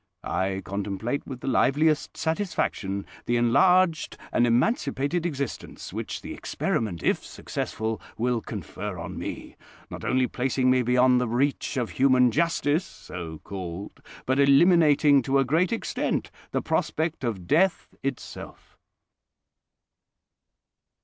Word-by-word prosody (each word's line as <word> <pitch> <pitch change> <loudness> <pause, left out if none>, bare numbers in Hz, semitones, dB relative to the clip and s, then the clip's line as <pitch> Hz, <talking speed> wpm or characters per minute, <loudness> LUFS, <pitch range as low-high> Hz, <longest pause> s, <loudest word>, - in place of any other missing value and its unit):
I 95 0 -1
contemplate 100 +6 -3
with 130 -3 -7
the - - -6
liveliest 150 +4 +2
satisfaction 160 - -1 0.2
the 120 - +2
enlarged 170 +8 +3
and 120 - +3
emancipated 140 - +1
existence 140 -5 -5
which - - -5
the - - -6
experiment, 95 -7 -2
if - - +1
successful, 110 0 -4 0.2
will 120 0 0
confer 105 -1 -6
on 85 0 -6
me; - - -7 0.3
not - - -7
only 130 0 +2
placing 130 +1 +1
me 130 0 +4
beyond 125 +1 +4
the 125 - 0
reach 135 +4 0
of 120 -3 -1
human 130 -2 +4
justice 160 +2 +1
(so 80 -3 -8
called), 95 0 -7 0.2
but 130 +2 +1
eliminating 145 -1 +5
to 135 +2 +1
a 135 - +3
great 165 - +2
extent 230 - -2 0.2
the - - -2
prospect 160 -2 -1
of 105 -7 -3
death 175 - +2
itself." 135 -2 -7
130 Hz, 125 wpm, -26 LUFS, 110-150 Hz, 0.3 s, eliminating